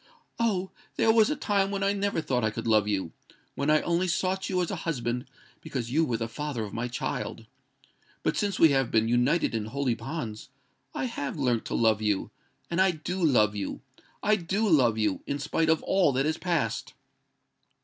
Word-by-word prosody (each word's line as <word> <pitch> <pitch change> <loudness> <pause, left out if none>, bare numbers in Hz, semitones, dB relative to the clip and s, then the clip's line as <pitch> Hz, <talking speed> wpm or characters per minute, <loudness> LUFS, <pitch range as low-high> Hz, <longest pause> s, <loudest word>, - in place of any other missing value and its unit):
"Oh! 195 -5 0 0.2
there 225 - +4
was 220 +1 +5
a 300 - 0
time 200 -7 +1
when 200 0 -2
I 200 0 +2
never 200 -4 -1
thought 125 -5 -1
I 110 - +2
could 115 +1 -6
love 110 -2 +3
you—when 105 - -4
I 155 0 +5
only 175 +2 0
sought 185 +2 -1
you 185 -2 0
as 175 - -3
a 195 - -3
husband 125 -6 -2 0.3
because 130 -7 -4
you 160 +5 +3
were 120 -5 -1
the 115 0 -3
father 130 0 -4
of 105 - -7
my 115 +2 -2
child:—but 125 - -6
since 205 -1 0
we 165 - +7
have 135 -3 +2
been 110 0 +2
united 125 +8 +2
in 110 -2 -1
holy 130 +2 -1
bonds, 115 -2 -6 0.5
I - - -1
have 165 - -4
learnt 125 -5 0
to - - -3
love 110 -2 +3
you—and 110 - -3
I 190 - +5
do 175 +2 -3
love 110 -9 +4
you—I 205 - -3
do 195 +5 -1
love 130 - +4
you—in 110 +6 -1
spite 155 +3 0
of 160 -1 +2
all 190 -6 +3
that 135 +2 +1
has 155 +1 -1
passed!" 165 -12 -1
145 Hz, 185 wpm, -28 LUFS, 115-185 Hz, 0.5 s, we